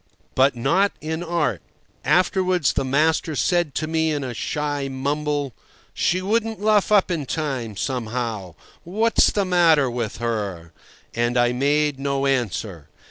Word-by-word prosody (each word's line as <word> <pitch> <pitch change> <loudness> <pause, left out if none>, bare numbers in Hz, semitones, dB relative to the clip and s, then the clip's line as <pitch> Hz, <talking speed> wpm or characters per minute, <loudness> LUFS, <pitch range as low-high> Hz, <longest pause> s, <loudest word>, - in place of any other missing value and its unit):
But 135 0 +3
not 170 +12 +2
in 160 +2 -4
art. 160 - -1 0.4
Afterwards 185 -3 +2
the - - 0
master 155 +3 +1
said 150 - +1
to 155 - -1
me 160 0 0
in 145 -2 -2
a 125 -2 -4
shy 145 +2 -2
mumble, 145 0 -2 0.4
"She 185 +2 0
wouldn't 225 +2 0
luff 210 0 +2
up 200 -3 +4
in 155 -6 -2
time, 130 -10 -3
somehow. 115 - -3 0.3
What's 220 +6 +2
the 200 -2 0
matter 165 -7 +4
with 120 -3 -3
her?" 100 -8 -3 0.4
And 120 +1 0
I 120 0 +3
made 145 +2 +1
no 140 0 -1
answer. 110 - -2
145 Hz, 140 wpm, -22 LUFS, 120-170 Hz, 0.4 s, up